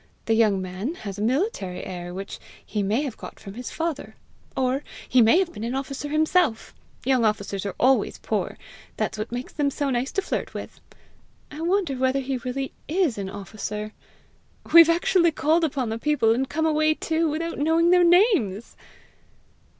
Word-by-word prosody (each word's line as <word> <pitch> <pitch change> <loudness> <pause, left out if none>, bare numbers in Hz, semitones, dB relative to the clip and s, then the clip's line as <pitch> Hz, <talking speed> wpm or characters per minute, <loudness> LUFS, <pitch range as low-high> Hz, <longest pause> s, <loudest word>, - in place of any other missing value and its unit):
The 225 - +2
young 215 -3 +3
man 185 - -4
has 200 0 -5
a - - -3
military 235 - -1
air 175 -1 -6
which 195 +2 -7 0.3
he 210 - -2
may 210 +8 +1
have 270 -6 -5
got - - -10
from 195 - -9
his 245 +3 -6
father; 325 -3 -4 0.4
or 260 +2 0 0.2
he 255 - +4
may 235 +12 +5
be 335 - -8
an 240 +3 -2
officer 275 +2 -4
himself: 310 -4 +1 0.3
young 260 -2 +3
officers 200 -2 -1
are 195 - -5
always 265 +1 +3
poor; - - -3 0.4
that's - - -2
what 215 - -4
makes 245 +2 -5
them 290 -2 +1
so 280 0 -2
nice 250 +2 -1
to 390 - 0
flirt - - -3
with. - - -8 0.7
I 300 +2 -7
wonder 350 -3 +1
whether 260 +1 +1
he 265 0 -2
really 255 +2 -4
IS 315 - +1
an 195 -1 -4
officer! 210 +2 -6 0.8
We've 335 -1 +10
actually 340 0 +3
called 320 +3 +2
upon 265 -6 -1
the 225 +1 -3
people, 265 -5 +2
and 260 +3 -1
come 320 +1 0
away 310 0 +2
too, 325 0 0
without 330 +2 -3
knowing 325 +3 +3
their 360 0 +6
names!" 340 - +3
265 Hz, 175 wpm, -24 LUFS, 220-320 Hz, 0.8 s, We've